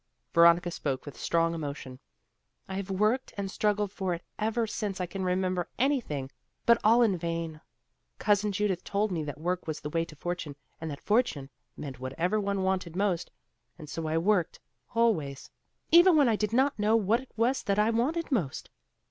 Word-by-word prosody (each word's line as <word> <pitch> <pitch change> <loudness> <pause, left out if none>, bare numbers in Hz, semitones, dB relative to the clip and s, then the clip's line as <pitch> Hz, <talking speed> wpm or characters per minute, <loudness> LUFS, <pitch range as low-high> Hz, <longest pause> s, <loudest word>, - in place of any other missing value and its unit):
Veronica 170 +1 +5
spoke 135 -5 -3
with 145 - -8
strong 165 0 +1
emotion. 140 -5 -6 0.7
"I 190 - -6
have 195 0 -4
worked 215 +7 0
and 195 -1 -3
struggled 210 -2 0
for 190 -3 -2
it 170 - -10 0.2
ever 225 +2 0
since 210 -3 -3
I 180 - 0
can 190 +2 -5
remember 185 -1 0
anything, 230 - 0 0.3
but 235 0 +6
all 230 +3 +6
in 210 -5 +3
vain. 165 -2 -3 0.6
Cousin 205 0 +2
Judith 195 -2 -1
told 205 +1 0
me 165 -3 -1
that 145 0 -6
work 180 +2 -2
was 155 - -3
the 150 - -6
way 165 +1 +1
to 155 - -13
fortune, 175 -2 -4 0.3
and 160 - -4
that 145 -1 -7
'fortune' 205 - +1 0.3
meant 135 -4 -7
whatever 165 +11 -1
one 200 -1 -1
wanted 185 -3 -1
most; 190 -3 0 0.5
and 155 - -10
so 160 +1 -4
I 160 +1 0
worked, 180 0 +1 0.4
always, 165 -13 0 0.4
even 345 +1 +8
when 285 -3 +5
I 225 - +3
did 210 0 -1
not 265 +1 +2
know 210 +2 +3
what 225 +1 +3
it 265 - -13
was 240 +4 +1
that 200 0 0
I 210 +2 +3
wanted 295 +9 0
most. 175 - -2
190 Hz, 185 wpm, -29 LUFS, 165-215 Hz, 0.7 s, even